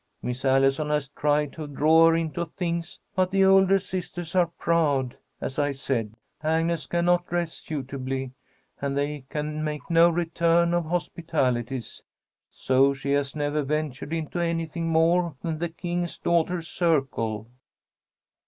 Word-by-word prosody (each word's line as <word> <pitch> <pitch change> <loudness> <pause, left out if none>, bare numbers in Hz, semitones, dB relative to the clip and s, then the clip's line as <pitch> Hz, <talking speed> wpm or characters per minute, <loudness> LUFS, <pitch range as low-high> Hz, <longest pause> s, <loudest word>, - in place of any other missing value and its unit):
Miss 125 +1 -4
Allison 135 +2 +3
has 150 -2 0
tried 150 0 0
to 155 -2 -6
draw 160 +3 +5
her 165 - +3
into 165 +1 -2
things, 170 -1 -4 0.2
but 185 -1 +2
the 195 0 +3
older 195 0 +6
sisters 180 -3 -5
are 180 -2 +4
proud, 155 -7 0 0.2
as 135 - -4
I 145 -1 +1
said. 115 -5 -2 0.3
Agnes 165 0 0
cannot 175 +1 +2
dress 170 -1 -1
suitably, 135 -2 -4 0.5
and 140 0 -1
they 145 -1 -2
can 150 0 -3
make 150 +1 -4
no 165 +1 +6
return 170 0 +2
of 175 -1 +1
hospitalities, 135 -8 -2 0.5
so 135 +1 +2
she 140 +1 -3
has 140 0 0
never 145 0 0
ventured 150 0 -3
into 165 +1 -3
anything 165 -1 -1
more 165 0 +2
than 160 -3 -2
the 170 0 -1
King's 175 +1 -3
Daughters' 170 0 0
Circle." 135 - 0
160 Hz, 140 wpm, -26 LUFS, 140-170 Hz, 0.5 s, older